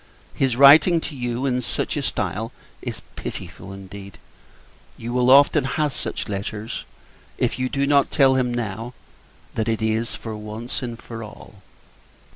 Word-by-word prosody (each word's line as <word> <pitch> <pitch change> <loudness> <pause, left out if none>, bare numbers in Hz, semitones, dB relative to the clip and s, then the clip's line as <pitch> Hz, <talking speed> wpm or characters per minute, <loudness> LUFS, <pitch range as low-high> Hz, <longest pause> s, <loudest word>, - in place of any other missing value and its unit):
His 130 -3 +1
writing 145 +6 +8
to 150 - -5
you 125 0 -2
in 125 -2 +1
such - - -2
a - - -1
stile 110 +3 -2 0.3
is - - -5
pitiful 95 - -6
indeed. 100 0 -10 0.8
You 120 +1 -5
will 125 0 +3
often 140 +2 +6
have 145 +1 0
such - - -4
letters, 105 +2 -4 0.5
if - - 0
you 130 0 0
do 140 +1 0
not 140 -1 +4
tell 135 -2 +5
him, 130 -2 +1
now, 115 0 -4 0.6
that 110 0 -1
it 110 -1 0
is 110 +1 0
for 110 -2 -6
once 105 +3 -5
and 120 -2 -5
all. 110 -3 -9
120 Hz, 150 wpm, -23 LUFS, 110-130 Hz, 0.8 s, writing